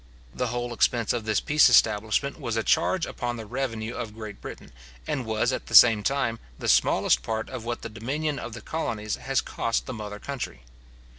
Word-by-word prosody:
The - - -1
whole 120 0 -3
expense 115 -1 +2
of 115 -3 -3
this 110 -2 +2
peace 150 -2 +5
establishment 110 +6 +3
was 115 -5 -3
a 115 - 0
charge 185 +8 +2
upon 120 0 -4
the 110 - -7
revenue 115 -1 -3
of 110 -3 -6
Great 110 -2 -8
Britain, - - -9 0.3
and 125 - -3
was, 110 +3 +1
at - - -4
the - - -1
same 115 -3 +9
time, 115 -1 0 0.2
the - - -5
smallest - - +3
part 110 - -3
of 125 -3 -6
what 120 0 -4
the - - -3
dominion 135 +7 -3
of 120 - -7
the 120 - -8
colonies 105 -8 -3
has 135 0 0
cost 115 - -2
the 130 - -5
mother 105 -2 -6
country. 120 - -6
115 Hz, 200 wpm, -26 LUFS, 110-130 Hz, 0.3 s, same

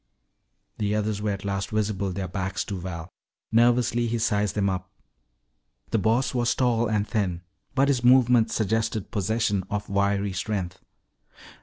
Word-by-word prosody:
The 105 0 0
others 105 -1 -1
were 105 - -1
at 100 0 -3
last 100 0 -2
visible, 105 -3 -1
their 95 +1 -3
backs 95 +1 -3
to 100 -3 -4
Val. 85 -2 -6 0.4
Nervously 120 0 +3
he 115 +1 -1
sized 105 -2 0
them 100 -1 +1
up. 90 -1 -2 1.0
The 110 - +2
Boss 115 +6 +1
was 120 -1 +1
tall 120 -2 +2
and 105 -1 0
thin, 95 -6 -1 0.3
but 140 0 +4
his 130 -4 +1
movements 125 -2 +5
suggested 110 -1 -1
possession 105 -1 0
of 105 0 -3
wiry 100 0 +1
strength. 95 -2 -3
105 Hz, 150 wpm, -25 LUFS, 100-115 Hz, 1.0 s, movements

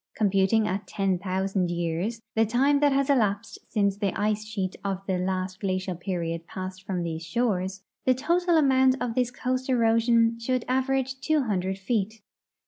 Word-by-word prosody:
Computing 205 +1 +2
at 195 +1 -3
ten 195 -3 0
thousand 190 0 -1
years, 175 +7 -2
the 225 - +3
time 265 +6 +3
that 290 0 +4
has 275 0 +2
elapsed 215 -7 +1
since 200 -3 +1
the 200 -2 -2
ice 215 0 0
sheet 200 -4 -3
of 195 -1 -3
the 185 -2 -1
last 185 +1 -2
glacial 185 -1 -2
period 170 -2 -4
passed 185 0 -6
from 180 -3 -1
these 165 -1 -4
shores, 190 -1 -1 0.2
the 255 - +4
total 345 +5 +2
amount 265 -3 +4
of 245 -2 -2
this 250 0 +1
coast 255 +1 -3
erosion 230 -1 +3
should 255 +1 -1
average 265 0 0
two 310 +1 +1
hundred 190 -4 -1
feet. 215 +2 -2
210 Hz, 165 wpm, -26 LUFS, 185-250 Hz, 0.2 s, that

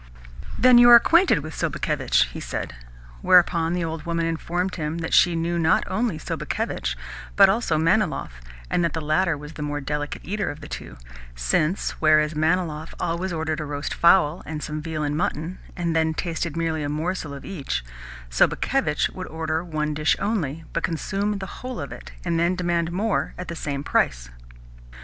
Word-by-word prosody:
"Then 250 -1 +7
you 240 0 +8
are 240 - +11
acquainted 330 - +5
with 155 +1 -7
Sobakevitch?" - - +1
he - - -8
said; - - -4 0.5
whereupon 170 -2 +4
the 175 -1 -1
old 160 -1 -4
woman 170 0 -1
informed 175 +3 -2
him 155 -1 -3
that 165 -1 -4
she 175 -1 +5
knew 170 +1 -1
not 160 - +3
only 210 -3 -1
Sobakevitch, 65 - -3 0.4
but 195 -1 +7
also 195 -6 +1
Manilov, 170 - +1 0.4
and 175 - +1
that 170 - 0
the 160 - -2
latter 155 +2 +1
was 150 +2 -10
the 150 - -8
more 145 0 -2
delicate 145 +1 -4
eater 205 +3 -2
of 145 - -7
the 145 - -10
two, - - -8 0.4
since, 105 - 0
whereas 155 0 +4
Manilov 160 0 -1
always 175 +3 -2
ordered 160 -1 -2
a 155 - -3
roast 145 0 -4
fowl 170 -2 +4
and 155 -1 -6
some 155 0 -4
veal 155 -1 -3
and 145 0 -1
mutton, 175 0 -2 0.2
and 170 -2 -1
then 160 0 +1
tasted 165 -2 -3
merely 165 -2 -1
a 145 - -2
morsel 160 +1 -3
of 140 - -10
each, 140 - -4 0.5
Sobakevitch - - +1
would - - -6
order 160 0 -2
one 155 -3 -2
dish 150 +1 +2
only, 165 -8 -2
but 165 - 0
consume 200 +6 -1
the 195 - -5 0.2
whole 255 -1 -5
of - - -6
it, - - -9
and 170 -1 0
then 170 +2 +2
demand 170 -2 0
more 205 +4 -1
at 180 - -6
the 170 - -4
same 140 -3 -4
price. - - 0
165 Hz, 180 wpm, -24 LUFS, 150-180 Hz, 0.5 s, are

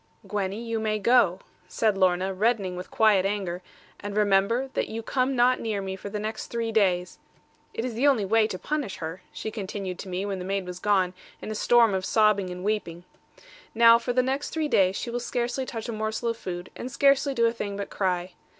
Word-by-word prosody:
'Gwenny, 200 0 -2
you 230 -1 -3
may 215 -1 0
go,' 210 -5 +3 0.3
said 215 -3 +1
Lorna, 185 0 +2
reddening 200 -2 0
with 180 +1 -7
quiet 215 -4 +4
anger; 195 -3 -2 0.4
'and 205 0 -5
remember 210 +6 +2
that - - -1
you 225 +1 -5
come 260 +3 0
not 250 +1 +4
near 220 -3 -2
me 190 -1 -4
for 195 +1 -8
the 210 - -4
next 215 +1 -4
three 230 -1 -2
days. 185 -5 +1 0.5
It 225 - -4
is 250 - -3
the 250 +6 +2
only 245 -8 +3
way 220 +2 +3
to 185 - -5
punish 285 -1 -3
her,' 165 +2 -6
she 220 - -5
continued 195 -3 -5
to 195 - -7
me, 185 +2 -2
when 195 -2 -3
the - - -5
maid 195 0 -2
was 180 0 -7
gone, 190 -2 +2 0.3
in - - -6
a - - -2
storm 230 0 +4
of 190 -1 -1
sobbing 210 -2 +3
and 180 0 -7
weeping. 190 -5 -2 0.7
'Now, 230 0 +7
for 245 - -2
the 255 +1 +2
next 270 +2 -2
three 315 -2 -1
days, 190 -8 +3
she 235 - -4
will 240 - -2
scarcely 245 +2 -2
touch 225 -2 -5
a - - -3
morsel 220 +1 -2
of 230 - -2
food, 175 -3 -6
and 255 - -6
scarcely 275 0 +3
do 235 -1 +3
a 230 - +2
thing 205 -3 -4
but 200 - -5
cry. 180 -2 -1
210 Hz, 220 wpm, -26 LUFS, 190-235 Hz, 0.7 s, Now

